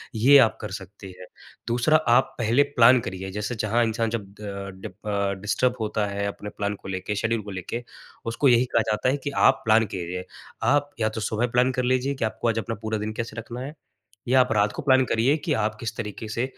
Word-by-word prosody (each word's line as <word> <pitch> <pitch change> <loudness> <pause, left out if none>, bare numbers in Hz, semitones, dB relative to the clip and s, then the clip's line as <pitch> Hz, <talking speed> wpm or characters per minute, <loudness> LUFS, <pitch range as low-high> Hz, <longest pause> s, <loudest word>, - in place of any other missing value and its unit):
ये 135 +6 +7
आप 110 - -4
कर - - -6
सकती 100 0 -9
है। 90 - -9 0.4
दूसरा 120 +6 +3
आप 130 -4 +2
पहले 120 +4 +3
प्लान 120 +2 +7
करिए 95 -2 -6
जैसे 105 +4 -3
जहाँ 110 +2 +1
इंसान 115 0 -1
जब 115 0 -2 0.2
अ, 100 -1 -6
डि 95 +3 -9
अ, 100 0 -2
डिस्टर्ब 125 +5 +1
होता 105 -1 -1
है 100 0 -3
अपने 105 +1 -6
प्लान 105 0 -3
को 95 - -13
लेके, 95 +2 -3
शेड्यूल 115 +2 0
को 100 - -8
लेके 95 +6 -5 0.4
उसको 115 +5 +1
यही 120 +1 +5
कहा 115 - +4
जाता 105 +4 +1
है 135 - +1
कि 145 - -2 0.2
आप - - -12
प्लान 115 0 +5
कीजिए। 90 0 -4 0.4
आप 145 +4 +2
या 110 - +2
तो 110 0 -5
सुबह 110 +3 0
प्लान 125 +2 +2
कर 125 0 -1
लीजिए 130 +2 +1
कि 130 - -1
आपको 110 - -3
आज 115 - 0
अपना 115 +1 -4
पूरा 110 0 -2
दिन 105 +1 -4
कैसे 115 +1 -5
रखना 120 +2 -6
है 140 +3 -6 0.5
या 130 +2 +4
आप 125 - 0
रात 105 0 +2
को - - -5
प्लान 130 -2 +4
करिए 120 +6 +2
कि 165 - -1
आप 110 -3 0
किस 115 -1 -4
तरीके 110 0 -5
से 115 +3 -1
115 Hz, 230 wpm, -25 LUFS, 105-125 Hz, 0.5 s, ये